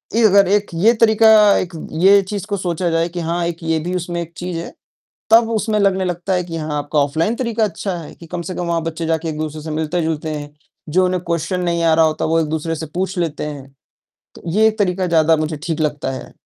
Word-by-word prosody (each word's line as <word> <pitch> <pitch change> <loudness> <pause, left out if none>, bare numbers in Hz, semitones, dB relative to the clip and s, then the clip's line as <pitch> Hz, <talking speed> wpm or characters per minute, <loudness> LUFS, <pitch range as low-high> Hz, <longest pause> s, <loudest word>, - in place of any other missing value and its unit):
ये 230 - +3
अगर 200 -1 +5
एक 205 +1 +2
ये 215 +8 +4
तरीका 220 0 +6 0.3
एक 175 -1 -3 0.3
ये 200 +1 +7
चीज़ 205 -3 -3
को 200 -1 -2
सोचा 175 -1 -1
जाए 165 +1 0
कि 175 +1 -6
हाँ 170 +1 -1
एक 170 0 -6
ये 160 -1 0
भी 175 +3 -3
उसमें 175 -1 -3
एक 170 0 -8
चीज़ 180 -1 -4
है 170 - -7 0.6
तब 225 0 +6
उसमें 215 -1 0
लगने 190 -1 +2
लगता 175 +1 -2
है 180 -1 +1
कि 165 -1 -6
हाँ 155 -1 -3
आपका 145 +1 -1
ऑफलाइन 160 +10 0
तरीका 235 -3 -1
अच्छा 195 -1 -2
है 160 - -9
कि 170 - -13
कम 175 +2 -5
से 185 - -6
कम 175 - -3
वहाँ 170 -1 0
बच्चे 165 0 -4
जाके 160 0 -1
एक-दूसरे 155 0 -4
से 155 +1 -6
मिलते-जुलते 160 0 -2
हैं। 145 -1 -6 0.4
जो 185 +4 +3
उन्हें 180 -1 -1
क्वेश्चन 170 +2 -1
नहीं 170 -1 0
आ 165 -1 +4
रहा 160 - +5
होता 155 -1 -1
वो 165 +1 +2
एक-दूसरे 160 +1 -2
से 160 - -5
पूछ 190 +1 -2
लेते 165 -4 -2
हैं। 140 -3 -7 0.7
तो - - -14
ये 220 +4 +4
एक 215 0 -4
तरीका 185 -2 0
ज़्यादा 160 -1 +3
मुझे 155 0 -2
ठीक 165 -2 -2
लगता 145 -3 -1
है। 130 - -8
170 Hz, 235 wpm, -19 LUFS, 160-185 Hz, 0.7 s, ये